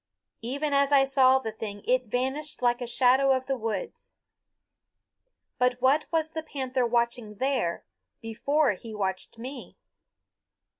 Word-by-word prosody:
Even 280 +5 -2
as 280 0 +3
I 275 -1 +6
saw 265 -1 +4
the 225 -4 -4
thing 210 -2 -7
it 255 0 +2
vanished 265 +5 -3
like 240 0 +2
a 245 - -3
shadow 260 +2 +4
of 260 0 -3
the 270 - -1
woods. 220 -5 -5 1.4
But 250 0 +2
what 265 +4 +3
was 320 -1 0
the 320 - -4
panther 260 -5 -2
watching 235 -2 -1
there 250 -7 -1 0.3
before 280 +6 +1
he 220 +3 -10
watched 190 +1 -4
me? 260 +4 -9
255 Hz, 140 wpm, -27 LUFS, 230-275 Hz, 1.4 s, I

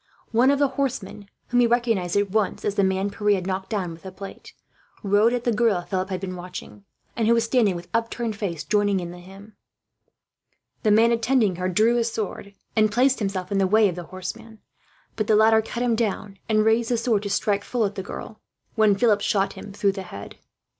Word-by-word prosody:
One 240 +4 +4
of 280 - +3
the 285 -1 +2
horsemen, 210 -7 -3 0.2
whom 245 - +2
he 240 - +5
recognized 230 -7 0
at 200 -1 0
once 215 -1 0
as 205 - 0
the 200 - +1
man 190 +1 0
Pierre 210 0 +1
had 185 -2 -4
knocked 190 0 -3
down 195 -6 -2
with 165 0 -11
the 190 - -8
plate, 195 +1 -10 0.5
rode 205 +3 +3
at 245 -1 -2
the 240 - +1
girl 220 -4 +2
Philip 190 0 -3
had 185 -1 -3
been 185 -1 -5
watching; 180 +3 -9 0.3
and 225 -2 0
who 235 - +5
was 230 - +2
standing, 230 -5 +2
with 175 0 -8
upturned 230 -1 -1
face, 180 -7 -4
joining 205 -2 +1
in 175 -1 -6
the 175 - -10
hymn. 195 +4 -14 1.3
The 215 - +2
man 225 +3 +5
attending 230 -5 +2
her 185 +1 -1
drew 220 +6 +3
his 235 -1 0
sword, 200 -2 -5 0.2
and 215 -1 +3
placed 260 +3 +3
himself 195 -2 -3
in 200 - +1
the 190 - +3
way 215 +2 +4
of 175 - -5
the 175 -1 -7
horseman; 220 +6 -8 0.6
but 215 -1 -2
the 215 - +4
latter 220 +1 +5
cut 235 +2 -4
him 240 -2 +2
down, 210 -3 -3
and 215 0 +3
raised 225 +1 +2
the 240 - +1
sword 230 -3 +1
to 205 - -4
strike 200 0 0
full 240 -3 0
at 200 - -2
the 195 - -4
girl, - - -9 0.3
when 215 -3 +4
Philip 210 -1 +3
shot 195 -1 +1
him 205 - -10
through 200 0 +1
the 195 0 -6
head. 100 - -10
210 Hz, 220 wpm, -24 LUFS, 190-230 Hz, 1.3 s, he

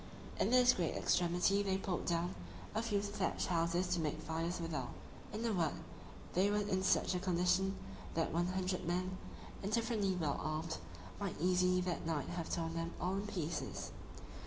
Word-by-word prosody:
In - - +3
this 250 0 +7
great 170 -4 0
extremity 180 +3 +3
they 195 -1 +1
pulled 190 -2 -2
down 175 +1 +1 0.4
a 220 - +1
few 210 -3 0
thatched 205 0 -1
houses 170 +1 +2
to 180 -1 +1
make 155 -1 -1
fires 165 +2 -2
withal; 165 -2 -2 0.4
in 220 +2 -3
a 225 - +2
word, 165 -5 +1 0.6
they 190 +3 +4
were 205 - +2
in 190 -1 +1
such 190 0 +3
a 180 - 0
condition, 180 +1 +2 0.4
that 165 - +1
one 175 +1 +2
hundred 185 -1 -1
men, 185 +1 -1 0.4
indifferently 215 -2 +1
well 155 -5 0
armed, 155 +1 -2 0.4
might - - -3
easily 180 +1 +3
that 180 -2 -2
night 150 -4 -1
have 170 -2 -3
torn 165 -1 -1
them 165 +1 -3
all 180 +1 0
in 200 +2 -2
pieces. 170 -5 -3
180 Hz, 170 wpm, -36 LUFS, 165-195 Hz, 0.6 s, this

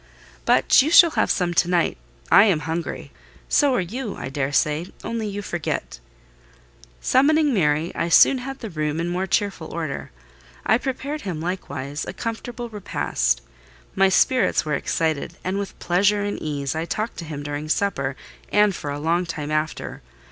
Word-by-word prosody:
"But - - +5
you 290 - 0
shall 335 0 +8
have - - +1
some 175 -2 +1
to 175 +1 +2
night. 175 -2 +2 0.4
I 200 +3 +8
am 180 -8 +2
hungry: 165 +1 -4 0.4
so 285 -3 +3
are - - +2
you, 220 +5 -5
I - - -6
daresay, 145 +3 0 0.2
only 230 -2 -3
you 205 0 -5
forget." 60 - -4 1.0
Summoning 295 - +3
Mary, 160 -3 +1
I 170 - -2
soon 260 +9 +6
had 270 +2 -7
the 225 -4 -6
room 155 -1 -2
in 170 +1 -1
more 185 +2 -1
cheerful 195 -6 -1
order: 160 -5 -4 0.6
I 220 - +4
prepared 280 +3 -4
him, 180 -6 -4
likewise, 145 -5 -4
a - - -5
comfortable 240 +1 -5
repast. - - -1 0.5
My 195 0 +4
spirits 255 0 +3
were 150 - -1
excited, 160 -1 -1
and 190 +2 -1
with 200 - -6
pleasure 200 +4 +2
and 205 0 -3
ease 140 -3 -2
I 160 +1 -2
talked 215 +6 -3
to 170 - -6
him 150 -2 -6
during 145 +1 -5
supper, 140 -8 0 0.4
and 210 -1 +4
for 150 - -5
a 145 - -3
long 170 +4 0
time 150 -2 -4
after. 155 +1 -2
175 Hz, 170 wpm, -23 LUFS, 155-210 Hz, 1.0 s, shall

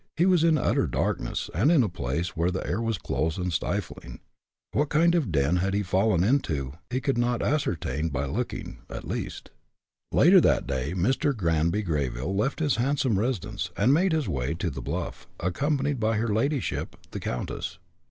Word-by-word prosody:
He 170 - +4
was 180 -4 +4
in 165 -2 +4
utter - - +1
darkness, - - -1
and 110 - +3
in 155 -7 +5
a - - +1
place 85 +1 -3
where 85 +2 +1
the 90 +1 -3
air 105 +6 -1
was 115 -2 0
close 80 -1 -1
and 90 -2 -2
stifling. - - -3 0.5
What 145 +1 +1
kind 170 +3 +4
of 170 -5 +2
a - - -7
den 80 0 +2
he - - 0
had 100 +1 0
fallen 95 0 +2
into 80 - 0 0.2
he 125 - 0
could 135 -2 0
not 120 0 +1
ascertain 80 - 0
by 70 -1 -2
looking, 70 - -4
at - - -7
least. - - -5 0.6
Later - - +7
that - - +3
day 70 +5 -2
Mr. 130 +8 +1
Granby 85 +2 +1
Greyville 75 0 -2
left 135 +10 0
his 145 -5 +2
handsome 130 -4 +1
residence, 105 -5 -2
and 120 +7 +4
made 180 +5 +3
his 155 -6 0
way 70 -2 -1
to - - -2
the - - -6
bluff, - - -4
accompanied 140 - 0
by 110 0 +1
her 115 +1 0
ladyship, 140 +5 -1 0.2
the - - -4
countess. 60 - -4
105 Hz, 185 wpm, -27 LUFS, 85-135 Hz, 0.6 s, Later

